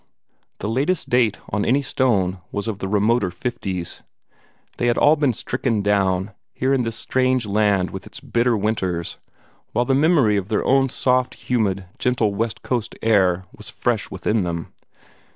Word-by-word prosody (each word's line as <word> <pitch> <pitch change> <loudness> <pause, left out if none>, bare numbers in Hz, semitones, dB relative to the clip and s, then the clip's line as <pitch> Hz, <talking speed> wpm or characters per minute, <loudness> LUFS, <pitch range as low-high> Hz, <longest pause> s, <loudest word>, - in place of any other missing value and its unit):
The - - -4
latest 140 +11 0
date 120 -4 +3
on 105 0 0
any 135 +4 +2
stone 110 -9 +1
was 100 +2 -3
of 105 -3 -3
the 95 - -3
remoter 105 +1 +2
'fifties. 95 -3 -4 0.8
They 120 - 0
had 120 - +2
all 150 +2 +5
been 145 -4 +2
stricken 115 -1 -2
down, 95 -1 +1 0.2
here 130 +2 +1
in 135 - +2
this 115 -2 -3
strange 130 -2 +1
land 100 -2 +1
with 95 0 -7
its - - -9
bitter 120 -1 +1
winters, 95 -5 -2 0.5
while 120 - +2
the 135 - +1
memory 140 -7 +4
of 95 -1 -2
their 110 -1 0
own 135 0 +3
soft, 130 0 +1
humid, 100 -6 -1
gentle 115 -5 +1
west 110 +2 -3
coast 120 -4 -2
air 95 -5 +3
was - - -10
fresh - - -1
within 110 0 0
them. 85 -2 -4
110 Hz, 165 wpm, -22 LUFS, 100-125 Hz, 0.8 s, all